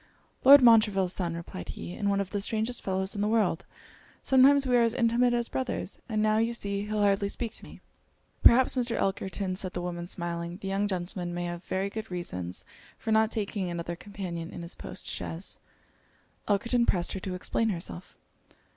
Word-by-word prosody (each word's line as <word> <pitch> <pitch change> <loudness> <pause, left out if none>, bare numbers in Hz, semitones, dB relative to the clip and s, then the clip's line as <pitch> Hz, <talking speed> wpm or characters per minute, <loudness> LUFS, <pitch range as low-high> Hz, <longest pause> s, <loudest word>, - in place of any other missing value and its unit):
'Lord 280 0 +9
Montreville's 210 -6 +5
son,' 170 -3 -2
replied 170 +2 -7
he; 175 - -6
'and 200 +1 -1
one 200 0 +1
of 200 -1 -3
the 205 - -2
strangest 220 +4 -1
fellows 190 0 -1
in 205 - -3
the 205 - +1
world. 210 -5 +1 0.6
Sometimes 275 +1 +5
we 250 -1 +2
are 240 - +5
as 230 0 +2
intimate 240 0 +3
as 240 -1 0
brothers; 255 -6 -4
and 215 -1 0
now 215 0 +3
you 230 +1 +1
see 200 -2 -3
he'll 210 -1 0
hardly 200 0 +2
speak 230 +1 -4
to - - -8
me.' - - -12 0.6
'Perhaps, 255 +2 +6
Mr. 245 -2 0
Elkerton,' 190 -1 -1
said 185 -1 -4
the 175 - -3
woman, 175 -1 -4
smiling, 170 -1 -4
'the 195 - -7
young 195 +2 0
gentleman 175 -2 -4
may 175 - -2
have 175 0 -5
very 195 +1 -2
good 220 +1 -6
reasons 90 - -4 0.3
for 220 - -4
not 220 0 +4
taking 205 -4 -2
another 170 0 -4
companion 175 -3 -6
in 170 - -8
his 170 - -6
post - - -7
chaise.' 165 +4 -4 0.9
Elkerton 235 +4 +2
pressed 175 -2 +1
her 190 - -4
to 185 0 -4
explain 225 +5 -1
herself. 175 -1 -5
200 Hz, 190 wpm, -28 LUFS, 180-225 Hz, 0.9 s, Lord